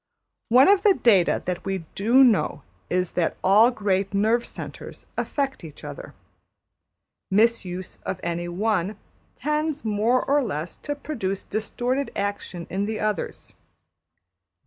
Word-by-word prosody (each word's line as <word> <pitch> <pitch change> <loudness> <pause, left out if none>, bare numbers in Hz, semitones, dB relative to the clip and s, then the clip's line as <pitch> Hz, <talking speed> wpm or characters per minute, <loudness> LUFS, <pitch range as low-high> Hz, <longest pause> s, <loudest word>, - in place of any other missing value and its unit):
One 250 +4 +7
of 395 -1 +5
the 405 -2 +5
data 200 - +3
that 180 -1 -3
we 190 -3 -3
do 235 +7 +5
know 235 -6 +2 0.3
is 180 -1 0
that 175 - -1
all 210 +5 +6
great 200 -4 -1
nerve 220 +4 +2
centres - - -9
affect 275 -7 -2
each 155 -3 -11
other. - - -8 1.1
Mis 225 +2 +3
use 180 0 -7
of 190 - -4
any 170 0 -2
one 195 +1 -1 0.4
tends 300 0 -2
more 220 +4 +2
or 285 +1 +3
less 165 -6 -4
to 290 - -4
produce 225 -10 -4
distorted 245 +5 -2
action 200 -4 -3
in 195 +3 -2
the 215 -1 -3
others. 210 -4 -3
210 Hz, 135 wpm, -24 LUFS, 185-250 Hz, 1.1 s, One